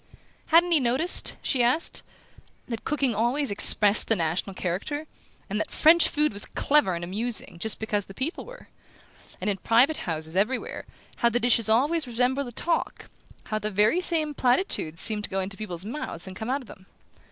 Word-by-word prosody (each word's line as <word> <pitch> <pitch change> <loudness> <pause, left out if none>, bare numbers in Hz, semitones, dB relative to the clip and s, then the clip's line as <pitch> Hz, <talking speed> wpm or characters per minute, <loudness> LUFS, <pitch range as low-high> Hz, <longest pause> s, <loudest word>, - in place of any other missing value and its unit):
Hadn't 345 +2 +4
he 325 - +6
noticed, 260 +8 +2
she 260 - 0
asked, 255 +8 0 0.7
that 230 -3 -6
cooking 275 -5 -1
always 240 +5 -1
expressed 205 +1 +7
the 225 - +2
national 175 +2 -3
character, 200 - -4 0.4
and - - -3
that - - -3
French 325 +2 +4
food 300 -4 0
was 200 - -2
clever 280 -11 0
and 170 - -6
amusing 210 0 -2
just 220 +4 -1
because 210 -2 -3
the 195 - -14
people 285 - -4
were? - - -14 0.7
And - - -5
in 200 -2 0
private 245 - +2
houses, 160 -1 -4
everywhere, 215 +7 -2 0.3
how 235 - +2
the 240 +1 -1
dishes 235 -2 +2
always 285 +7 +1
resembled 250 +3 -1
the - - -8
talk 335 +8 -3 0.3
how 215 - -4
the 215 0 -4
very 215 - +2
same 315 -4 +3
platitudes 245 - 0
seemed 210 0 0
to - - -10
go 195 - -3
into 190 +1 -5
people's 190 -4 -7
mouths 220 - -6
and 190 -1 -10
come 220 +5 -6
out 275 +2 -1
of 250 - -15
them? 190 0 -15
235 Hz, 185 wpm, -25 LUFS, 200-290 Hz, 0.7 s, expressed